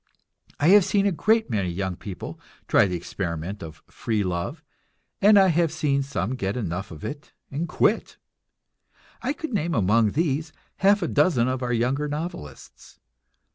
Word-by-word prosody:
I 150 - +4
have 205 +1 +8
seen 200 +2 +1
a 200 - +3
great 220 - +1
many 100 -5 0
young 95 +1 -3
people 95 +1 -8 0.3
try - - +4
the 90 - -3
experiment 85 +2 -4
of 80 -2 -10
"free 110 -3 -2
love," 85 -2 -3 0.6
and 205 +1 +7
I 190 -1 +6
have 170 -1 +2
seen 145 -3 0
some 130 -5 -2
get 105 -4 -2
enough 95 -4 -3
of 80 -2 -9
it 145 0 -7 0.2
and 155 +5 -3
quit; - - +1 1.0
I 255 - -1
could 305 -2 -5
name 170 -4 0
among 110 0 +3
these 155 0 -1 0.2
half 200 0 +4
a - - 0
dozen 150 -6 +2
of 130 0 -2
our 125 -1 -2
younger 125 +5 0
novelists. 145 - -7
135 Hz, 165 wpm, -25 LUFS, -, 1.0 s, have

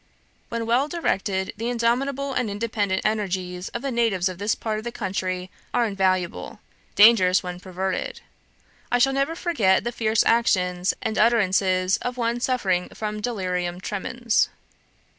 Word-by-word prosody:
"When 230 -1 -3
well 245 +5 +2
directed, 195 - -1
the 230 +2 -2
indomitable 260 +4 0
and 250 -4 0
independent 205 -2 -1
energies 185 -4 -2
of - - -6
the 275 - -2
natives 225 -7 +1
of 185 -1 -8
this 205 +2 +1
part 215 -1 -3
of - - -9
the 240 - -4
country 185 -4 -3 0.2
are 240 - +3
invaluable; 185 -4 -1 0.4
dangerous 205 -4 +6
when 180 -1 -6
perverted. 190 - -4 0.7
I 245 - +4
shall 270 +2 +3
never 275 +4 0
forget 225 - +2
the 240 - -2
fierce 220 -2 +1
actions 180 -6 +2
and 220 - -1
utterances 190 -4 +3
of 245 0 -4
one 235 0 0
suffering 195 -8 0
from 210 -1 -5
delirium 180 -6 -2
tremens. 230 +4 0
215 Hz, 145 wpm, -24 LUFS, 185-235 Hz, 0.7 s, dangerous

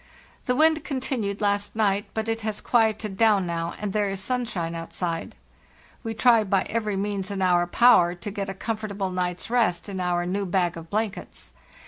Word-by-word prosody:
The 250 - +2
wind 315 +1 +4
continued 250 -7 -3
last 205 0 0
night, 205 -2 +1
but 220 0 -2
it 225 0 -1
has 215 -1 -3
quieted 220 -4 +1
down 210 -4 +4
now, 170 -1 -3
and 205 -2 -3
there 210 -1 +1
is 195 0 -4
sunshine 200 -7 -2
outside. 165 0 -4 0.7
We 225 0 -4
try 230 -1 +5
by 195 -2 +1
every 215 -3 -2
means 200 0 -2
in 200 -1 -4
our 175 -2 +3
power 180 -4 +5
to 190 +4 -7
get 200 -1 -4
a 195 - -5
com 225 +3 -3
fortable 200 -3 -3
night's 180 +3 -3
rest 220 -8 +1
in 195 -2 -5
our 175 -1 0
new 195 +2 -2
bag 175 -1 +1
of 165 0 -9
blankets. 215 0 -4
200 Hz, 185 wpm, -25 LUFS, 180-220 Hz, 0.7 s, try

